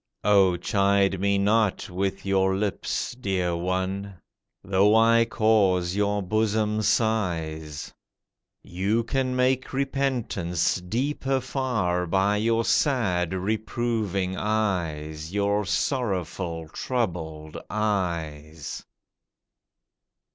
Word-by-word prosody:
O 95 -3 +4
chide 100 0 +2
me 100 +1 +2
not 105 +1 +2
with 95 +2 -3
your 95 -1 +2
lips, 105 +6 -2
dear 95 -7 -1
one! 95 +3 -2 0.5
Though 100 +3 +3
I 115 +1 +5
cause 95 -6 +2
your 105 0 0
bosom 110 +2 0
sighs. 85 -9 -1 0.7
You 100 +6 0
can 130 +1 -1
make 130 +1 +1
repentance 130 -12 0
deeper 135 +7 -1
far 115 -10 -1
By 95 +4 +2
your 115 +1 +1
sad, 95 - +1
reproving 105 -1 -1
eyes, 85 -7 -2
Your 100 0 +1
sorrowful, 95 - -2
troubled 80 -9 -3
eyes. 85 -8 -3
100 Hz, 90 wpm, -25 LUFS, 90-110 Hz, 0.7 s, I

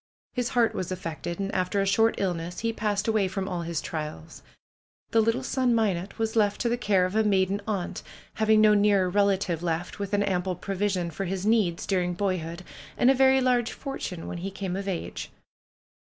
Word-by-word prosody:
His 245 -1 -1
heart 230 -2 +4
was 185 0 -4
affected, 170 -1 -5
and 195 0 -2
after 185 +2 0
a 195 - +2
short 225 +3 +3
illness 175 -2 -2
he 230 0 0
passed 210 -1 -1
away 215 -3 +2
from 190 0 -3
all 180 -3 -3
his 170 -1 -2
trials 150 - -6 0.7
The 225 - +4
little 225 +1 +1
son, 255 -3 +1
'Minot, 195 -4 0
was 225 0 -1
left 205 -2 +2
to 240 - +1
the 235 - +2
care 200 -6 +2
of 185 +3 -4
a 220 - +4
maiden 195 -1 +2
aunt, 200 -5 -2 0.3
having 220 0 +4
no 215 -1 +6
nearer 200 -3 +3
relative 195 -4 +1
left 170 +1 -3
with 200 0 -4
an 205 - +2
ample 185 -2 -1
pro 195 +3 -5
vision 190 -3 -1
for 195 +5 -4
his 190 +1 -3
needs 210 -6 +2
during 180 -2 0
boyhood, 180 -3 -2 0.3
and 250 - +5
a - - +5
very 265 0 +4
large 245 -2 +2
fortune 240 - -5
when 175 - -5
he 190 +3 -4
came 190 -2 -4
of 195 +1 -4
age. 185 -4 -4
195 Hz, 200 wpm, -27 LUFS, 180-220 Hz, 0.7 s, no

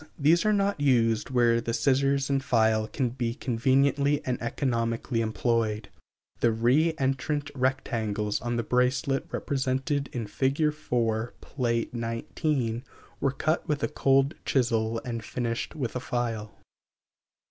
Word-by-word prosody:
These 165 +6 +4
are - - +4
not 200 -3 +1
used 115 -5 +2
where 120 -2 +3
the 115 0 -2
scissors 140 +1 +2
and 135 -1 0
file 110 -4 +2
can 130 +1 -1
be 120 -1 -3
conveniently 135 +4 +2
and 125 -1 -2
economically 115 -1 -1
employed. 110 -1 0 0.5
The 120 - +3
re 130 +9 +2
entrant 140 +2 -1
rectangles 115 -6 -1
on 120 -1 -2
the 120 - 0
bracelet 130 +3 +1
represented 135 +1 -1
in 120 -3 -3
Fig. 140 +8 +1
4, 115 -5 -1
Pl. 130 -3 -5 0.3
XIX, 115 +1 -2 0.4
were 135 - +2
cut 155 +5 -1
with 150 -3 -1
a - - +3
cold 135 +2 +2
chisel 115 -3 +1
and 115 -3 -4
finished 115 0 -3
with 130 -6 -3
a - - 0
file. 115 -4 -3
125 Hz, 135 wpm, -27 LUFS, 115-140 Hz, 0.5 s, These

